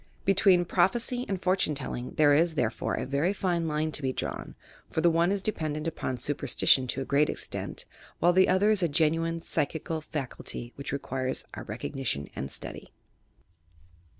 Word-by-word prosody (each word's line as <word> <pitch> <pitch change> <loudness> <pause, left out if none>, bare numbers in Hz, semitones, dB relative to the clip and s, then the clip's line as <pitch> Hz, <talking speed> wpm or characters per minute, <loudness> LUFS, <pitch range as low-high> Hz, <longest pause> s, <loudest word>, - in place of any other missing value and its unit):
Between 190 -2 +4
"Prophecy" 245 +7 +2
and 195 -2 -1
"Fortune 185 -4 +1
Telling" 130 -2 -5
there 145 -2 +5
is, 165 +2 +3
therefore, 120 -6 -1
a - - -3
very 140 +8 +1
fine 175 -4 0
line 155 +1 -1
to 150 - -5
be 130 -1 0
drawn, - - -5 0.3
for - - -2
the 170 +1 +4
one 170 +3 +3
ia 200 - +1
dependent 155 -6 -2
upon 130 -5 -3
superstition 130 0 +3
to 135 - -2
a - - -3
great 145 +2 +3
extent, - - -3 0.3
while 175 +1 +4
the 185 +1 +5
other 195 +3 +4
ia 215 - +3
a 170 - +3
genuine 165 +2 +1
psychical 160 +1 -2
faculty 130 -5 -5
which 140 - -6
requires 130 -2 -2
our - - -7
recognition 115 - -3
and 70 +2 -4
study. - - -7
160 Hz, 170 wpm, -28 LUFS, 140-180 Hz, 0.3 s, there